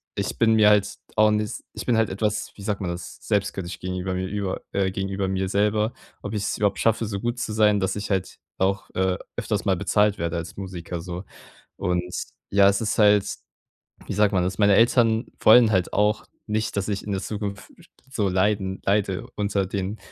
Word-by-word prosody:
ich - - -3
bin 115 -1 +4
mir 105 -1 +6
halt 105 0 +3 0.2
auch 110 0 +5
ni 105 0 +1 0.3
ich - - -6
bin 120 - +2
halt 110 -2 +2
etwas, 105 +2 -2
wie 100 - -11
sagt 100 -1 -2
man 90 - -2
das, 85 +1 -8
selbstkritisch 95 -4 -2
gegenüber 90 0 -3
mir 95 0 -2
über, 100 -1 -3
äh 95 -1 +1
gegenüber 95 0 -2
mir 95 0 -1
selber, 105 +2 +1 0.3
ob 100 - -5
ich 105 - -1
es - - -1
überhaupt 100 -1 +1
schaffe, 115 0 +2
so 100 -1 -3
gut 120 +2 -2
zu 110 -3 -3
sein, 105 -1 +4
dass 95 - -1
ich 105 0 -4
halt 95 -1 -2 0.2
auch, 95 +1 0
äh, 95 -1 +1 0.2
öfters - - -1
mal - - +2
bezahlt 105 -1 +2
werde 85 +1 -2
als 85 +1 -6
Musiker 90 -3 -6
so. 90 +2 -6 0.5
Und 90 0 0 0.5
ja, 100 0 +6
es 100 +2 +2
ist 110 - -1
halt, 105 -1 +5 0.8
wie - - -4
sagt 105 0 +3
man 90 - +3
das 95 +1 -3
meine 100 -2 +5
Eltern 115 0 +4
wollen 115 0 +7
halt 95 -3 +1
auch 105 +1 +1 0.2
nicht, 105 0 -2
dass 100 0 -1
ich 100 -2 -2
in 105 - -3
der 95 - -1
Zukunft 105 0 -5
f - - -17 0.2
so 105 -6 0
leiden 95 0 0
leide 100 -2 0
unter 100 -2 0
den 100 +2 -3
100 Hz, 205 wpm, -24 LUFS, 95-105 Hz, 0.8 s, wollen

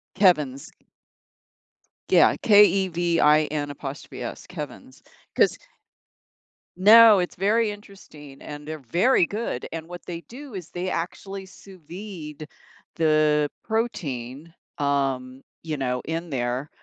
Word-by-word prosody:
Kevin's. 150 -9 +2 1.4
Yeah, - - +5
K-E-V-I-N, 170 -7 +3
apostrophe 140 0 -7
S, - - -7
Kevin's. 150 -6 -9 0.3
'Cause - - +3 1.2
no, 215 +2 +8
it's 180 - -3
very 210 +3 +1
interesting, 175 -9 -13
and 150 0 -9
they're 155 0 -5
very 190 +2 +4
good, 205 - -4
and 165 0 -6
what 175 0 -10
they 170 -1 -6
do 270 +1 -10
is 180 -4 -7
they 180 +1 -4
actually 190 +3 -5
sous 190 0 -15
vide 165 -6 -8 0.5
the 155 -2 +2
protein, 155 - -4 0.2
um, 135 -2 -1 0.2
you 155 -2 -4
know, 125 -2 -2
in 165 +2 -4
there, 125 +1 -2
165 Hz, 110 wpm, -24 LUFS, 145-195 Hz, 1.4 s, no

